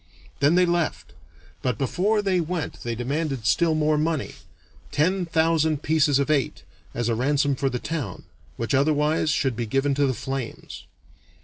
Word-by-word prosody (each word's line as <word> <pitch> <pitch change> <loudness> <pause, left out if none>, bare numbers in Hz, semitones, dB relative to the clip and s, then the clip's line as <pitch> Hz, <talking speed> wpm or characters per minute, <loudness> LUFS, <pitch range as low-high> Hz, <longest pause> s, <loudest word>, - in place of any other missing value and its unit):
Then 145 +4 +4
they 180 0 +5
left, 170 -2 -1 0.5
but 125 -4 -1
before 205 - +1
they 190 -2 +2
went 165 -1 -4
they 120 -1 -3
demanded 135 0 -2
still 165 +4 +3
more 155 0 +2
money 155 -1 -1 0.6
ten 180 +4 +1
thousand 160 -2 +1
pieces 155 -2 +3
of 140 +2 +1
eight 140 -4 0 0.3
as 120 -1 -1
a 115 - +1
ransom 140 +4 +1
for 135 +1 0
the 125 - -2
town, 135 - -4 0.3
which 115 +4 -2
otherwise 150 +3 +2
should 135 -5 +1
be 115 0 -3
given 135 +5 +1
to 140 0 +2
the 130 - -1
flames. 135 +1 -6
145 Hz, 165 wpm, -24 LUFS, 135-160 Hz, 0.6 s, they